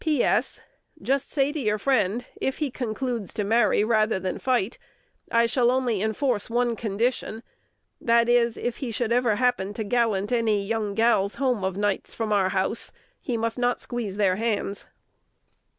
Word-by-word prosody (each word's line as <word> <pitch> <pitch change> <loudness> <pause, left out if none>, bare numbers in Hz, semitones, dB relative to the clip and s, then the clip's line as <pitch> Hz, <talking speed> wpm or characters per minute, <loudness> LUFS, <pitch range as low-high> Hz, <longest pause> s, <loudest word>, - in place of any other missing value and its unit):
P. 305 -6 +2
S. - - +1 0.4
Jist 275 -1 0
say 280 -1 +1
to 305 - -4
your 215 -5 0
friend, 235 -1 +1 0.2
if 265 - -1
he 295 -4 -2
concludes 235 -3 -3
to 210 - -1
marry 215 0 +3
rather 215 -2 +2
than 185 0 -3
fight, 245 -4 0 0.5
I 230 0 +4
shall 240 +1 +2
only 245 -5 +1
inforce 220 +1 0
one 240 0 +1
condition: 225 +1 -2 0.6
that 235 0 +3
is, 240 -1 +3
if 240 -1 -3
he 260 - -4
should 230 0 -2
ever 240 -3 +3
happen 235 -5 0
to 220 - -2
gallant 210 -2 0
any 220 -4 +1
young 215 -1 -2
gals 225 -3 +2
home 255 -7 0
of 190 0 -2
nights 205 -1 -1
from 220 -2 -1
our 195 -2 +3
house, 190 +5 -1 0.3
he 245 -5 -2
must 230 +1 -2
not 245 0 +1
squeeze 225 -5 -4
their 190 -3 +2
hands. 210 -3 -2
230 Hz, 170 wpm, -25 LUFS, 205-245 Hz, 0.6 s, I